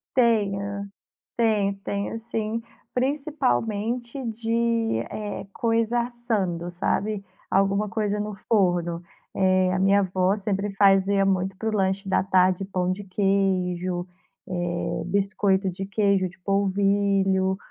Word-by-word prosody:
Tenho, 200 -4 +1 0.5
tenho, 210 -4 +2
tenho 200 +3 -3
sim. 225 0 -3 0.3
Principalmente 250 - -1
de, 230 - 0
eh, 210 -2 -5
coisa 230 +1 +1
assando, 215 -8 -2
sabe, 200 +3 -1 0.3
alguma 195 +2 +2
coisa 210 -1 -1
no 210 0 -3
forno. 175 -5 +1 0.3
É 185 -1 +3
a 185 - 0
minha 195 +1 +4
avó 185 +1 +1
sempre 200 0 -2
fazia 195 0 +4
muito 190 0 0
para 220 +3 -3
o - - -1
lanche 195 -1 0
da 190 - +2
tarde 185 0 +3
pão 185 -2 -1
de 200 +2 -6
queijo, 185 -2 0 0.4
eh, 175 -2 -2
biscoito 195 0 +1
de 190 +2 -6
queijo, 200 -2 +2
de 180 - -18
polvilho, 195 -1 +2
200 Hz, 120 wpm, -25 LUFS, 190-215 Hz, 0.5 s, minha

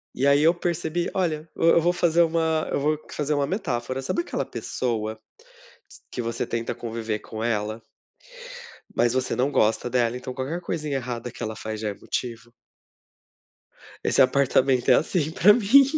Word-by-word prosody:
E 135 - 0
aí 140 +1 +5
eu 165 +3 +5
percebi 175 -1 -2
olha, 160 -4 -1
eu 165 - +3
eu 170 - +5
vou 175 +2 +2
fazer 170 -1 +3
uma 160 -1 +1
eu - - 0
vou 150 +2 +2
aqui 155 - -10
fazer 150 0 0
uma 145 -1 +1
metáfora, 130 - -2
sabe 240 - -1
aquela - - -3
pessoa, 110 -3 -3 0.9
que 125 - -3
você 115 0 -2
tenta 115 0 -3
conviver 115 -2 -4
com 110 +1 -7
ela 110 -1 -1 1.1
mas 120 0 +3
você 130 0 0
não 135 +3 +1
gosta 110 +1 +2
dela, 120 -1 +1
então 130 0 -7
qualquer 140 +7 -4
coisinha 150 -4 -3
errada 120 -2 -4
que - - -8
ela 110 0 -4
faz 110 0 -5
já 110 - -1
é 100 - -3
motivo. 120 +2 -5 1.5
Esse - - +3
apartamento 130 -1 +3
é 130 - +8
assim 160 -1 0
para 205 +5 +6
mim. 240 +5 +6
135 Hz, 175 wpm, -25 LUFS, 115-160 Hz, 1.5 s, é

